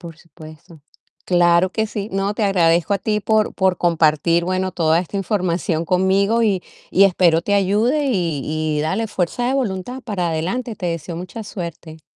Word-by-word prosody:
Por 170 -3 -10
supuesto. 155 -1 -15 0.4
Claro 175 0 +3
que 220 +2 -1
sí. 210 -1 -5
No, 195 +1 -1
te 220 - -3
agradezco 175 -1 +2
a - - -1
ti 210 +1 -1
por 215 0 +1
por 190 -2 +1
compartir 170 0 +2
bueno, 185 0 -1
toda 165 -2 +2
esta 185 +3 -4
información 180 -3 -1
conmigo 195 +6 +2
y 195 -5 +1 0.3
y 195 - +5
espero 175 -3 +3
te 205 - 0
ayude 215 +9 +2
y 170 - -1 0.4
y - - 0
dale 190 +9 -1
fuerza 205 +6 -2
de 265 - 0
voluntad 245 0 -3
para 185 -8 -2
adelante. 200 +9 -3
Te 180 - -5
deseo 165 0 -4
mucha 180 +6 -7
suerte. 170 -4 -8
185 Hz, 175 wpm, -20 LUFS, 170-205 Hz, 0.4 s, y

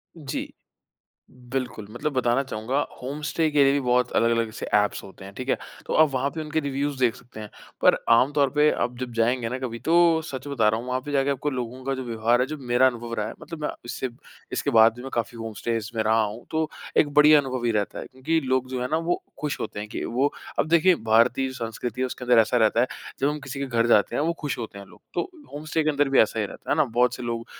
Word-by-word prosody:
जी। 150 -5 -5 1.0
बिल्कुल, 125 -5 -3
मतलब 145 +7 -3
बताना 125 0 +2
चाहूँगा 130 0 -3 0.2
होम 140 +4 -5
स्टे 160 +1 0
के 145 -1 +4
लिए 135 - +4
भी 140 - +1
बहुत 125 -1 +2
अलग-अलग 115 -1 +2
से - - -6
ऐप्स 105 0 +2
होते 95 0 -12
हैं, 100 - -10
ठीक 130 +4 -7
है। - - +3 0.3
तो - - -2
आप 155 0 +6
वहाँ 135 +2 0
पे 160 - -6
उनके 155 0 -1
रिव्युज़ 140 -1 -2
देख 120 -3 +3
सकते 120 -3 -12
हैं। 105 - -8 0.3
पर - - +6 0.2
आमतौर 140 +4 +4
पे 150 +1 +5
आप 125 0 -2
जब 125 -1 -5
जाएँगे 115 +1 +1
ना 125 +2 -3
कभी, 125 -3 -5
तो 165 +2 +4
सच 135 -4 -7
बता 120 -7 +2
रहा 110 +1 +1
हूँ, 120 - -9
वहाँ 125 0 0
पे 145 - -5
जाके 140 0 +2
आपको 140 +2 -1
लोगों 125 -1 -5
का 135 0 -1
जो 130 -1 -5
व्यवहार 115 +1 +1
है, 125 - +2
जो 155 +3 -5
मेरा 125 -1 +3
अनुभव 120 -2 -2
रहा 105 -2 -2
है - - -7
मतलब 165 -1 -8
मैं 150 - 0 0.2
इससे 125 +2 -3 0.4
इसके 145 - -1
बाद 115 -2 +6
भी 125 - -9
मैं 135 - -7
काफ़ी 115 0 -2
होम 115 -1 -5
स्टेज़ 115 -1 -2
में 110 - +2
रहा 110 +1 +3
हूँ, 110 +3 -5
तो 160 -1 0 0.3
एक 150 - +5
बढ़िया 150 +1 +8
अनुभव 130 -3 -4
ही 120 - +2
रहता 105 -2 -1
है। - - -6
क्योंकि 155 +6 -1
लोग 130 0 0
जो 130 -1 -3
है 125 - -2
ना, 155 - +2
वो 165 +2 -1 0.2
खुश 150 -1 -2
होते 105 - -4
हैं 105 - -6
कि - - -5
वो 130 +5 0 0.3
अब - - +1
देखिए, 170 +3 +5
भारतीय 115 +2 +2
संस्कृति 120 0 -5
है 130 - +2
उसके 125 0 -7
अंदर 125 -1 +5
ऐसा 110 +3 +1
रहता 115 0 +3
है, 125 - +3 0.3
जब 135 - +3
हम 150 +1 -2
किसी 135 +1 -6
के 140 - -1
घर 115 -2 +1
जाते 115 -1 +3
हैं - - +1
वो 165 +2 +1
खुश 145 -3 -3
होते 110 -4 -6
हैं 100 - -10
लोग, - - -18
तो 380 - -2 0.2
होम 150 +1 -7
स्टे 155 +1 0
के 155 - +3
अंदर 145 -1 +1
भी 135 - +3
ऐसा 110 +1 +2
ही 105 - 0
रहता - - -10
है, - - +4
है 155 - +5
ना? - - +3
बहुत 125 +1 +2
से - - -8
लोग 115 -1 -3
130 Hz, 265 wpm, -25 LUFS, 115-145 Hz, 1.0 s, बढ़िया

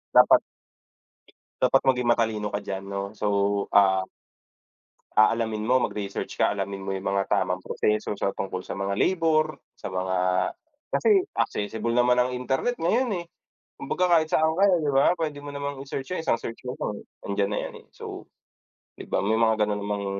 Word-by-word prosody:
dapat, - - +7 1.2
dapat 130 +1 +4
maging 125 -2 +2
matalino 110 -3 +1
ka 100 0 -4
diyan, 95 -1 -4
'no? 100 0 -3
So, 105 -1 -2 0.5
ah, 95 -2 +4 1.1
aalamin 110 0 +3
mo 125 +4 +3
mag-research 100 -2 -5
ka - - +2
alamin 100 -1 -4
mo 95 - -4
yung 95 0 -4
mga 100 0 0
tamang 95 -2 +1
proseso 105 +1 -1
sa 100 - -1
tungkol 95 -1 -4
sa - - -4
mga 100 +1 -2
labor, 160 -3 +1 0.2
sa 95 - -6
mga 95 0 -1 0.7
kasi 415 -4 +4 0.2
accessible 110 +3 -1
naman 125 0 +4
ang 125 +1 +2
internet 130 - -1
ngayon, 225 +6 +2
eh. - - -17 0.5
Kumbaga 180 -1 0
kahit 155 - -2
saan 160 0 +2
ka, - - +5
eh, 185 - +4
'di 145 - +1
ba? 140 +6 +4
Puwede 155 -4 -3
mo 145 0 -8
namang 140 -1 -4
i-search 135 +2 -6
yung 185 - -1
isang 160 - +1
search 115 0 -7
mo 125 - -3 0.5
nandiyan 100 0 0
na 105 - -2
'yan, - - -6
eh, - - -20
so - - -8 0.7
'di - - -8
ba? - - 0
May 110 +2 +1
mga 110 -1 +3
gano'n 105 -1 -1
namang 100 0 -3
110 Hz, 175 wpm, -26 LUFS, 100-140 Hz, 1.2 s, dapat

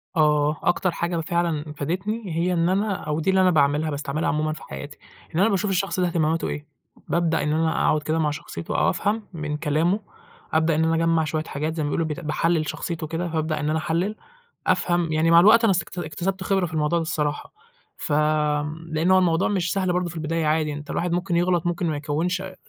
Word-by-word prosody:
آه 150 -1 +3
أكتر 185 +1 +2
حاجة 170 +1 -2
فعلًا 160 -2 -1
فادتني 190 +10 -2
هي 175 +2 +1
إن 170 0 +2
أنا 200 +2 +1
أو 150 +1 -2
دي 160 - 0
اللي 190 0 +4
أنا 185 -1 +5
باعملها 150 0 +2
باستعملها 145 +1 -2
عمومًا 155 +1 0
في 155 - -10
حياتي 145 +1 -8 0.4
إن - - +1
أنا 200 +4 +4
باشوف 200 0 0
الشخص 190 0 0
ده 180 - +2
اهتماماته 165 -1 0
إيه 150 - -5 0.4
بابدأ 170 -1 +1
إن 150 - 0
أنا 160 +1 +2
أقعد 150 -1 +2
كده 155 +2 0
مع 150 -2 +1
شخصيته 85 - -5
أو - - +3
أفهم 215 +2 -1
من 150 -2 -3
كلامه 165 +6 +1 0.5
أبدأ 160 0 +3
إن 160 - +2
أنا 165 0 +2
أجمّع 165 0 +2
شويّة 155 0 -2
حاجات، 155 +1 -3
زي 160 - -1
ما 145 - -1
بيقولوا 165 +3 0
ب 155 - -2
باحلّل 160 0 +1
شخصيته 165 -2 -4
كده، 165 +3 -3
فأبدأ 155 -1 -1
إن 150 - -1
أنا 160 +1 +1
أحلّل 175 +7 -1 0.5
أفهم 175 -2 +1
يعني، 160 +2 +2
مع 170 - +8
الوقت 215 +6 +7
أنا 215 -4 +5
اكت - - -12
اكتسبت 175 +4 -3
خبرة 190 -1 +1
في 160 - -7
الموضوع 155 +2 +1
ده - - -1
الصراحة، 150 -2 -2 0.4
ف - - -5 0.8
لأن 160 +4 +1
هو 185 - +7
الموضوع 175 -1 +2
مش 180 -3 0
سهل 185 -2 0
برضه 180 0 0
في 170 - -9
البداية 160 0 -1
عادي، 155 0 +1
أنت 145 +1 -8
الواحد 175 0 -1
ممكن 175 +1 0
يغلط، 175 -1 +2
ممكن 175 +1 -1
ما 155 - -1
يكوِّنش 160 +5 -1
آآ 190 -1 -8
165 Hz, 215 wpm, -24 LUFS, 155-180 Hz, 0.8 s, مع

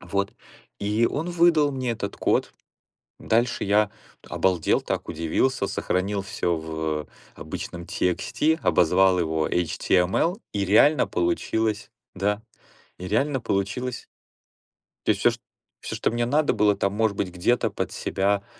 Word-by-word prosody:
Вот, 100 0 -2 0.5
и 105 +3 +2
он 160 +5 -2
выдал 170 -4 +4
мне 130 -2 -2
этот 100 -3 -5
код. - - +1 0.7
Дальше 120 +2 +1
я 105 +1 +3 0.3
т - - -18
обалдел 90 -4 +1
так, - - -4
удивился, 100 +8 0
сохранил 100 +2 -1
всё 85 -3 -1
в 80 -1 -3 0.3
обычном 85 0 -7
TXT, 150 - 0
обозвал 90 +2 +4
его 80 -2 0
HTML, 90 - +1
и 100 -2 0
реально 125 +10 +5
получилось, 110 - -1 0.2
да, 105 +3 -1 0.6
и 90 - -6
реально 135 +6 +1
получилось. 110 +5 -2 1.0
То - - +3
есть - - +1
всё - - +5
чт - - -8 0.4
всё, - - -5
что - - 0
мне 120 0 0
надо 145 +4 +2
было 105 -1 +3
там, 100 - 0
может 105 -1 0
быть, 95 - -2
где-то 95 +8 +1
под - - -3
себя, 100 +1 -1
100 Hz, 140 wpm, -25 LUFS, 90-125 Hz, 1.0 s, реально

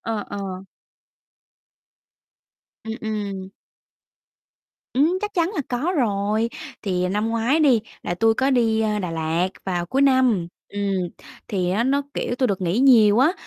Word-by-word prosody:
Ờ, 220 -2 -3
ờ. 200 - -5 2.5
Ừm, 225 - -4
ừm. 200 -3 -4 1.5
Ừm, 315 +8 +3
chắc 420 0 -4
chắn 340 0 +1
là 325 - 0
có 275 +9 -1
rồi, 215 -2 +1 0.3
thì 180 -3 0
năm 210 +4 0
ngoái 230 +7 +1
đi, 260 -7 +5 0.2
là 175 - -2
tui 225 +4 +3
có 265 +3 +1
đi, 230 -4 +2
à, 215 -1 0
Đà 180 -4 -3
Lạt 165 +2 0 0.2
vào 175 -2 -2
cuối 270 +9 +1
năm, 255 -9 +3 0.2
ừm, 205 - -5 0.7
thì 180 -3 -1
á 220 +5 +1
nó, 280 +2 +2
kiểu, 245 - -2
tui 255 +1 +1
được 195 -4 -1
nghỉ 180 +4 0
nhiều 230 -5 +6
á, 285 +7 +5
220 Hz, 150 wpm, -23 LUFS, 195-260 Hz, 2.5 s, nhiều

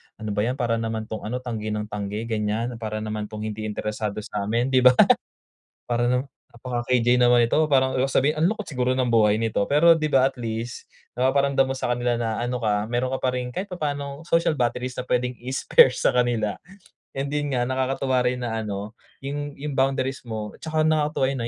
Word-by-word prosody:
"Ano 110 -1 -5
ba 100 - -2
'yan, 120 +5 0
para 120 -4 0
naman 110 -1 -3
'tong 110 0 -6
ano, 125 +3 -4
tanggi 110 -4 -4
ng 105 0 -2
tanggi 105 +1 -4
ganiyan, 115 +1 -2
para 110 -1 -4
naman 105 -1 -4
'tong 105 0 -7
hindi 110 0 -4
interesado 105 0 -3
sa'min," 110 +6 -1
'di 130 - +5
ba? 125 0 +6 1.0
"Para 120 0 +1
naman 125 +3 0 0.2
napaka-KJ 120 0 +1
naman 120 -1 +5
nito," 155 +7 +2
parang 130 -3 +2
sabihin, 140 +3 +1
"Ang 160 - +3
lungkot 215 - -5
siguro 125 -2 0
ng 130 -2 0
buhay 110 -1 +3
nito," 115 -1 -1
pero 165 +3 +5
di 155 - 0
ba, 135 -3 +3
at - - -22
least 115 0 -5 0.3
napaparamdam 135 +1 +3
mo 135 - -2
sa 130 - -3
kanila 120 0 0
na 115 -2 -2
ano 125 0 -3
ka, 105 -1 +1
meron 120 +2 -1
ka 130 - -2
pa 130 -1 -1
rin 125 -1 -3
kahit 185 +11 -4
papaano 145 -5 -4
social 165 -1 +2
batteries 125 -1 -1
na - - -4
puwedeng 125 0 -1
i-spare 130 +1 +4
sa 125 - 0
kanila, 120 -4 +1 0.6
and 140 +1 -2
'din 145 -3 -1
nga 120 - +1
nakakatuwa 130 0 0
rin 125 0 0
na 115 -1 -2
ano, 105 0 -5 0.2
'yun 145 +1 -5
'yung 145 +1 -5
boundaries 135 0 0
mo 110 -2 -5
at - - -18
saka 155 -1 0
nakakatuwa 155 -3 +1
'yun 135 -1 -2
ah, - - -2
125 Hz, 205 wpm, -24 LUFS, 110-135 Hz, 1.0 s, ba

